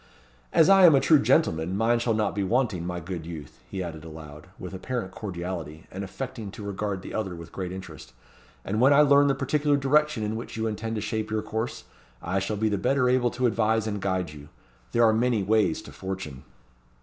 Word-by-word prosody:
As 160 Hz, -, +5 dB
I 195 Hz, -2 st, +8 dB
am 160 Hz, -, +7 dB
a -, -, +5 dB
true 155 Hz, +2 st, +5 dB
gentleman, 90 Hz, -, +2 dB
mine 115 Hz, +2 st, +2 dB
shall 115 Hz, -1 st, +1 dB
not 110 Hz, -1 st, 0 dB
be 100 Hz, -, -1 dB
wanting, 105 Hz, -5 st, 0 dB
my 90 Hz, -1 st, -3 dB
good 85 Hz, -1 st, -6 dB
youth," 80 Hz, -4 st, -9 dB
he 95 Hz, -2 st, -4 dB
added 80 Hz, -3 st, -7 dB
aloud, 75 Hz, -1 st, -10 dB
with 90 Hz, +1 st, -8 dB
apparent 95 Hz, +1 st, -4 dB
cordiality, 85 Hz, -5 st, -6 dB
and 95 Hz, +2 st, -5 dB
affecting 110 Hz, +1 st, -6 dB
to 105 Hz, -, -8 dB
regard 100 Hz, -1 st, -3 dB
the -, -, -8 dB
other 95 Hz, -5 st, -2 dB
with 85 Hz, 0 st, -10 dB
great 90 Hz, -2 st, -5 dB
interest; 95 Hz, -9 st, -9 dB, 0.5 s
"and 105 Hz, +4 st, -1 dB
when 135 Hz, +3 st, +6 dB
I 145 Hz, -, +7 dB
learn 145 Hz, -1 st, +6 dB
the 135 Hz, -, +2 dB
particular 145 Hz, +2 st, +1 dB
direction 145 Hz, -3 st, +2 dB
in 105 Hz, +1 st, -2 dB
which 115 Hz, 0 st, -6 dB
you 110 Hz, -, -1 dB
intend 110 Hz, +1 st, -3 dB
to 105 Hz, -, -2 dB
shape 110 Hz, 0 st, -3 dB
your 110 Hz, 0 st, -1 dB
course, 110 Hz, +2 st, -4 dB, 0.4 s
I 95 Hz, +7 st, -1 dB
shall 100 Hz, +2 st, -2 dB
be 110 Hz, +2 st, +1 dB
the 100 Hz, -2 st, 0 dB
better 130 Hz, +3 st, +2 dB
able 125 Hz, -1 st, +3 dB
to 125 Hz, +1 st, -2 dB
advise 110 Hz, -1 st, +2 dB
and 105 Hz, -2 st, -3 dB
guide 95 Hz, -4 st, -1 dB
you. 75 Hz, -1 st, -12 dB, 0.4 s
There 120 Hz, -, +3 dB
are 110 Hz, -, +5 dB
many 115 Hz, -2 st, +1 dB
ways 105 Hz, -4 st, +2 dB
to -, -, -11 dB
fortune." 95 Hz, -9 st, -6 dB
105 Hz, 215 wpm, -26 LUFS, 90-120 Hz, 0.5 s, I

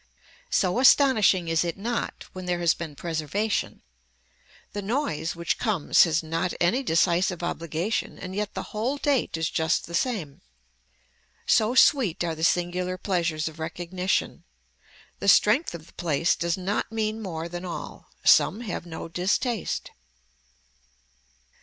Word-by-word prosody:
So 185 Hz, +5 st, +1 dB
astonishing 245 Hz, -, +5 dB
is 165 Hz, 0 st, +2 dB
it 170 Hz, +1 st, -3 dB
not 230 Hz, +4 st, -3 dB
when 185 Hz, -1 st, -7 dB
there 175 Hz, -1 st, 0 dB
has 170 Hz, -1 st, +4 dB
been 160 Hz, -4 st, -7 dB
preservation. 170 Hz, +7 st, -2 dB, 0.9 s
The 205 Hz, -, -3 dB
noise 195 Hz, -, -2 dB
which 170 Hz, 0 st, -2 dB
comes 205 Hz, -10 st, +3 dB
has 165 Hz, -1 st, 0 dB
not 165 Hz, +3 st, -2 dB
any 180 Hz, +10 st, +2 dB
decisive 175 Hz, -3 st, +1 dB
obligation 170 Hz, +4 st, -2 dB
and 185 Hz, 0 st, -7 dB
yet 210 Hz, +1 st, -3 dB
the -, -, -3 dB
whole 235 Hz, +7 st, -1 dB
date 275 Hz, -, 0 dB
is 160 Hz, 0 st, 0 dB
just 160 Hz, 0 st, 0 dB
the 170 Hz, -, -11 dB
same. 170 Hz, -, -2 dB, 1.0 s
So 225 Hz, +2 st, +3 dB
sweet 245 Hz, -, +4 dB
are 170 Hz, -2 st, -1 dB
the 160 Hz, 0 st, -6 dB
singular 180 Hz, +1 st, 0 dB
pleasures 170 Hz, -5 st, -1 dB
of 160 Hz, 0 st, -8 dB
recognition. 175 Hz, +3 st, -2 dB, 0.8 s
The -, -, -4 dB
strength 210 Hz, -, +4 dB
of 160 Hz, -2 st, -10 dB
the -, -, -20 dB
place 165 Hz, 0 st, +1 dB
does 170 Hz, +1 st, -1 dB
not 195 Hz, +4 st, -2 dB
mean 220 Hz, 0 st, -2 dB
more 170 Hz, -5 st, -4 dB
than 175 Hz, +1 st, -7 dB
all. 175 Hz, -2 st, -7 dB, 0.2 s
Some 215 Hz, -, +5 dB
have 200 Hz, -6 st, -5 dB
no 160 Hz, 0 st, -6 dB
distaste. 190 Hz, +6 st, -1 dB
180 Hz, 140 wpm, -26 LUFS, 165-215 Hz, 1.0 s, astonishing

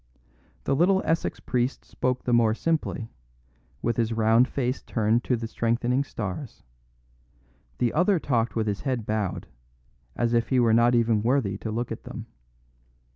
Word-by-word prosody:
The 135 Hz, -, +1 dB
little 190 Hz, +5 st, +3 dB
Essex 165 Hz, +1 st, 0 dB
priest 125 Hz, +1 st, -2 dB
spoke 125 Hz, 0 st, -2 dB
the 125 Hz, -, 0 dB
more 115 Hz, -2 st, +4 dB
simply, 155 Hz, -6 st, -2 dB, 0.7 s
with 115 Hz, -1 st, 0 dB
his 115 Hz, -1 st, +1 dB
round 115 Hz, +2 st, +4 dB
face 130 Hz, -1 st, -2 dB
turned 110 Hz, +1 st, +1 dB
to 125 Hz, -, +2 dB
the 115 Hz, -1 st, -4 dB
strengthening 120 Hz, +4 st, 0 dB
stars; 115 Hz, 0 st, -6 dB, 1.1 s
the 120 Hz, -2 st, +1 dB
other 185 Hz, +4 st, +3 dB
talked 120 Hz, -7 st, 0 dB
with 110 Hz, -1 st, 0 dB
his 100 Hz, -2 st, -2 dB
head 125 Hz, -6 st, -2 dB
bowed, 105 Hz, -4 st, -2 dB, 0.7 s
as 120 Hz, 0 st, 0 dB
if 115 Hz, 0 st, +1 dB
he 130 Hz, -, +3 dB
were 115 Hz, -2 st, +4 dB
not 120 Hz, +1 st, +4 dB
even 115 Hz, -2 st, +2 dB
worthy 115 Hz, -4 st, +1 dB
to 110 Hz, -, -5 dB
look 115 Hz, +2 st, -3 dB
at -, -, -6 dB
them. -, -, -7 dB
120 Hz, 160 wpm, -26 LUFS, 110-130 Hz, 1.1 s, more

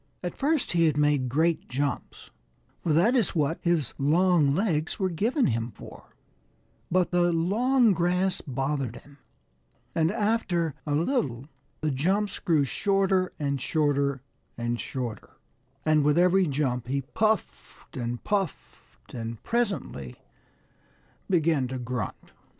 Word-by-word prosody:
At 175 Hz, -, -4 dB
first 295 Hz, 0 st, 0 dB
he 170 Hz, -1 st, +3 dB
had 150 Hz, -2 st, 0 dB
made 145 Hz, -3 st, +2 dB
great 160 Hz, +5 st, +1 dB
jumps, 140 Hz, +3 st, -3 dB, 0.5 s
for 165 Hz, -, -1 dB
that 180 Hz, -, +4 dB
is 230 Hz, -7 st, +1 dB
what 155 Hz, +1 st, 0 dB
his 170 Hz, -7 st, 0 dB
long 155 Hz, 0 st, +3 dB
legs 175 Hz, -5 st, 0 dB
were 190 Hz, -2 st, 0 dB
given 235 Hz, -, +1 dB
him 115 Hz, -1 st, 0 dB
for; -, -, -13 dB, 0.7 s
but 180 Hz, 0 st, +2 dB
the 175 Hz, -1 st, +3 dB
long 220 Hz, +8 st, +3 dB
grass 180 Hz, +2 st, +1 dB
bothered 135 Hz, -2 st, -2 dB
him, 145 Hz, +2 st, -15 dB, 0.7 s
and 160 Hz, -1 st, +2 dB
after 205 Hz, -7 st, 0 dB
a 145 Hz, -, +1 dB
little 145 Hz, -, 0 dB, 0.4 s
the 155 Hz, -1 st, 0 dB
jumps 190 Hz, +9 st, 0 dB
grew 155 Hz, -5 st, +2 dB
shorter 195 Hz, +3 st, +1 dB
and 140 Hz, -3 st, -2 dB
shorter 140 Hz, -3 st, 0 dB, 0.3 s
and 120 Hz, 0 st, -2 dB
shorter, 120 Hz, -5 st, -6 dB, 0.5 s
and 155 Hz, -1 st, +4 dB
with 150 Hz, +2 st, +3 dB
every 180 Hz, +1 st, +4 dB
jump 130 Hz, -4 st, -1 dB
he 140 Hz, +2 st, -1 dB
puffed 215 Hz, -, -2 dB
and 120 Hz, -2 st, -4 dB
puffed 195 Hz, -7 st, -4 dB
and 115 Hz, -2 st, -6 dB
presently 190 Hz, -, -2 dB, 1.1 s
began 160 Hz, -7 st, +2 dB
to 130 Hz, +1 st, -4 dB
grunt. 125 Hz, -5 st, -5 dB
155 Hz, 130 wpm, -27 LUFS, 135-185 Hz, 1.1 s, that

